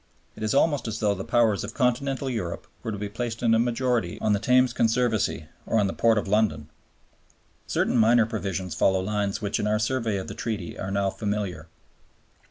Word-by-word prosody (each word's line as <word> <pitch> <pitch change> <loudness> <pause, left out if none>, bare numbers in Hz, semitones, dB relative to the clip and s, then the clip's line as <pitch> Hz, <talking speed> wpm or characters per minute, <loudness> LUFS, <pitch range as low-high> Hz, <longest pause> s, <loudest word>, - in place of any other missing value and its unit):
It - - -12
is 110 +4 0
almost 145 -3 +2
as 110 0 -3
though 105 -2 +1
the 95 -1 -5
Powers 115 -3 +2
of 105 +3 -7
Continental 135 +2 0
Europe 105 -10 -3 0.2
were 110 - -4
to 105 - -4
be 105 +1 -4
placed 115 +2 -4
in 115 -1 +4
a 115 - +4
majority 120 -5 0
on 105 - +1
the 100 - +1
Thames 125 +3 +3
Conservancy 115 -7 +1 0.2
or 110 -2 +2
the 95 - -1
Port 115 -1 +3
of 105 - -1
London. 95 -8 +1 1.0
Certain - - 0
minor 115 +1 +5
provisions 95 -5 -3
follow 95 +3 +2
lines 100 +1 -2
which 100 - -1
in 105 - 0
our 105 0 +2
survey 110 -1 0
of 95 - -5
the - - -6
Treaty 105 -6 -4
are 95 - -5
now 100 0 0
familiar. 100 -6 -3
110 Hz, 195 wpm, -26 LUFS, 100-120 Hz, 1.0 s, minor